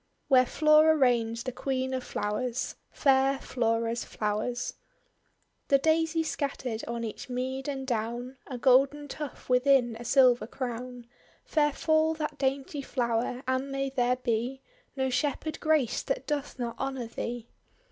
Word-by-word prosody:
WHERE 255 -2 +6
FLORA 305 +2 +5
REIGNS 235 -4 +2
THE 255 - -3
QUEEN 260 +1 -2
OF 255 -1 -2
FLOWERS 230 +4 -2
FAIR 270 -1 +3
FLORA'S 230 -2 -1
FLOWERS 215 +3 -2 0.9
The 275 - +5
Daisy 320 +2 +2
scattered 270 -7 -3
on 235 0 -3
each 220 +3 -6
mead 260 +2 -3
and 270 -2 -3
down, 240 +2 -3
A 255 - -5
golden 275 +4 +3
tuft 295 -1 -7
within 250 -2 +3
a - - -7
silver 250 -1 +4
crown, 245 -1 -5 0.4
(Fair 295 -1 +2
fall 315 +2 +2
that 300 -2 -4
dainty 275 +1 -1
flower! 245 -1 -1
and 260 +1 0
may 275 0 -2
there 250 -2 +2
be 250 +2 -2 0.3
No 265 -1 0
Shepherd 290 +4 -1
graced 310 -7 +1
that - - -1
doth 290 -2 -3
not 240 -2 -4
honour 265 -2 -2
thee!) 235 0 -5
260 Hz, 140 wpm, -28 LUFS, 240-280 Hz, 0.9 s, WHERE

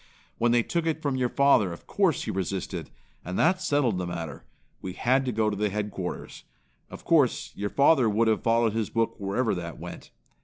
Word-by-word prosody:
When 120 0 +3
they 120 -1 +3
took 170 +4 -1
it 160 -1 0
from 145 -4 -1
your 125 -1 0
father, 140 -10 +3
of 85 - -10
course 190 -8 +1
he - - -3
resisted, 95 0 -4 0.3
and 90 +2 -4
that 185 +3 +3
settled 130 - +1
the 90 - -3
matter. 85 -5 -6 0.4
We 95 - -5
had 130 +7 +1
to 125 - -1
go 110 -1 +1
to - - -3
the 105 +1 0
headquarters. 100 -3 -5 0.5
Of - - -11
course, - - +2
your 100 0 -3
father 140 -3 +4
would 110 +2 +2
have 110 -2 +2
followed 115 -1 +2
his 110 -2 -1
book 115 0 0
wherever 100 +4 0
that 85 -2 -5
went. - - -9
110 Hz, 200 wpm, -27 LUFS, 95-130 Hz, 0.5 s, father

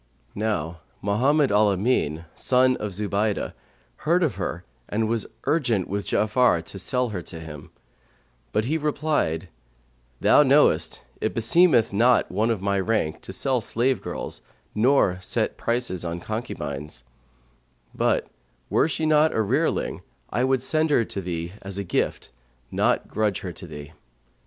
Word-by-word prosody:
Now 95 -6 -2 0.2
Mohammed 130 +8 +2
al 105 +1 +4
Amνn,[FN#134] 85 - 0
son 130 0 +3
of 105 - -3
Zubaydah, 100 +2 -1 0.4
heard 175 +3 +2
of 155 - +1
her 90 +1 -4 0.2
and 110 +1 0
was 115 -2 -1 0.2
urgent 120 - +1
with 100 +1 -3
Ja'afar 105 -5 +2
to 95 - -7
sell 125 +5 +1
her 95 -5 -4
to 80 - -9
him; 80 0 -9 0.8
but 110 - 0
he 155 +5 0
replied, 145 - -1 0.7
"Thou - - +6
knowest - - +3 0.2
it - - -1
beseemeth 120 - +4
not 120 +4 +3
one 105 +5 +1
of 110 -5 -1
my 100 0 +1
rank 95 -6 -1
to - - -8
sell 125 +6 0
slave 120 +4 0
girls - - -5 0.3
nor 110 -5 +3
set - - -1
prices 115 -7 -2
on 85 0 -3
concubines; 80 - -5 0.9
but - - +1 0.5
were - - +3
she 160 0 -2
not 155 0 +4
a 110 - +2
rearling 135 +10 0 0.3
I 125 - +1
would 130 -1 +1
send 155 +3 +1
her 120 -6 +3
to 100 - -5
thee, 85 -1 -4
as 95 0 -4
a 100 - -2
gift, 90 - -2 0.4
not - - +1
grudge 105 -2 -1
her 90 -2 -5
to 90 +2 -10
thee." 75 -1 -9
110 Hz, 150 wpm, -24 LUFS, 90-130 Hz, 0.9 s, Thou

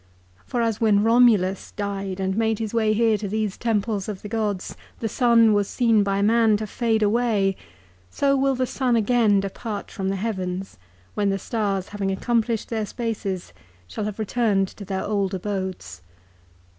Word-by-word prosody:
For 240 -1 0
as 225 -1 -1
when 210 -2 +4
Romulus 225 -5 +3
died 195 -2 -4
and 190 0 -1
made 225 0 +1
his 220 0 -4
way 220 -2 +2
here 220 -1 +2
to 205 - -4
these 215 -1 -2
temples 215 -3 -1
of 200 -3 -6
the - - -5
gods, 210 -4 -2 0.2
the 225 - -2
sun 230 -1 +4
was 205 -1 +2
seen 230 -4 +3
by 200 0 0
man 220 0 +4
to 215 - -4
fade 220 +1 0
away, 210 -3 +2 0.5
so 275 - +1
will 270 0 +2
the 255 0 0
sun 250 -1 0
again 225 -2 +3
depart 205 +2 -5
from 190 -1 -3
the 195 - -1
heavens, 190 - -4 0.3
when 205 -1 0
the 195 - 0
stars 195 -2 -2
having 200 -2 -2
accomplished 230 +3 0
their 220 -2 -2
spaces 200 -6 -4 0.3
shall 210 - -4
have 210 -1 -4
returned 215 -3 +1
to 200 - -10
their 190 0 -3
old 200 -2 -1
abodes. 185 - -5
210 Hz, 170 wpm, -23 LUFS, 195-230 Hz, 0.5 s, when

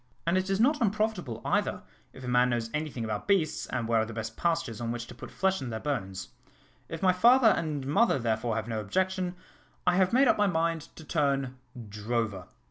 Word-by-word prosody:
And 170 +2 +2
it 185 +1 0
is 195 0 +1
not 290 +6 +3
unprofitable 210 - -1
either, - - 0 0.3
if 130 - -12
a - - -6
man 125 0 +3
knows 115 -2 -2
any 155 +1 -1
thing 120 -4 -5
about 105 -2 -4
beasts, 190 -6 +1
and 120 -3 -2
where 115 -1 +3
are - - 0
the 115 - -7
best 110 0 -5
pastures 165 -9 -1
on 115 -1 -2
which 120 0 -4
to - - -11
put - - -10
flesh 190 0 0
on 130 - -4
their 110 -1 -4
bones. 95 -9 -3 0.6
If 165 +1 -6
my 185 -1 +5
father 235 +5 +6
and 155 -8 -1
mother, 200 - +3
therefore, 115 -2 -1
have 110 0 -3
no 115 -2 -2
objection, 185 - -1 0.5
I 180 0 +3
have 190 -1 +3
made 260 +3 +5
up - - +3
my 205 - +4
mind 165 -3 0
to 160 - -11
turn 140 -4 0 0.3
drover." 105 -2 -3
145 Hz, 215 wpm, -29 LUFS, 115-185 Hz, 0.6 s, father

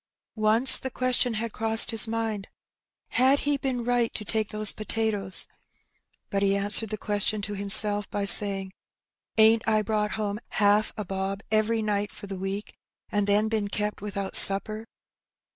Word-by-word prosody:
Once 220 +4 +5
the 260 - -6
question 250 -2 -1
had 225 0 -5
crossed 225 +1 +3
his 225 -1 +3
mind, 220 -3 -4 0.6
"Had 265 +3 +2
he 290 -1 -1
any 260 -2 -3
right 240 -1 -1
to 210 - -6
take 215 +3 -1
those 215 -1 +4
potatoes? 215 -3 -2
'^ - - -29 0.8
But 195 - -2
he 195 0 +1
answered 205 +2 +2
the 215 - -5
question 210 +1 -1
to 205 - -5
himself 205 +1 +5
by 205 -1 -4
saying, 195 -1 +2 0.6
'^Ain^t 220 +1 +4
I 215 -1 +1
brought 210 -1 -2
home 210 -1 -4
haaf 205 +1 +1
a 210 - -5
bob 195 +2 -5
every 220 +1 0
night 205 -1 -3
for - - -12
th' 195 -2 -8
week, 195 +2 -6 0.4
an' 205 -1 0
then 205 +2 +1
bin 215 -2 -3
kept 210 +1 -4
without 200 -1 -4
supper 215 +3 +2
210 Hz, 165 wpm, -25 LUFS, 200-225 Hz, 0.8 s, Once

